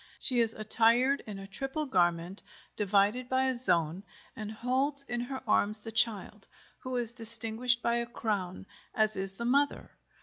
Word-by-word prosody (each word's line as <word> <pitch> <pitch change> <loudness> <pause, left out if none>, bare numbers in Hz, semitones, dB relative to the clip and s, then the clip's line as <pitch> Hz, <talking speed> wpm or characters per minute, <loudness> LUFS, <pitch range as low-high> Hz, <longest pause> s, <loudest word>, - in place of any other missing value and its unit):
She 250 -3 +3
is 225 -1 +4
attired 235 +5 +2
in 205 -2 -7
a 195 - -9
triple 270 +9 -5
garment, 175 - -1 0.3
divided 210 +5 0
by 260 0 +1
a 260 -1 0
zone, 170 -7 0 0.3
and 215 -1 -7
holds 260 +5 -1
in 240 -3 -4
her 260 +2 -6
arms 210 0 +1
the 220 +1 -10
child, 215 -2 -2 0.3
who 255 0 -6
is 235 -1 -1
distinguished 230 +1 +4
by 235 0 +1
a 235 0 -3
crown, 200 -7 -4 0.3
as 215 -1 +1
is 195 0 -5
the 235 +4 -6
mother. 280 +4 0
230 Hz, 165 wpm, -29 LUFS, 205-250 Hz, 0.3 s, is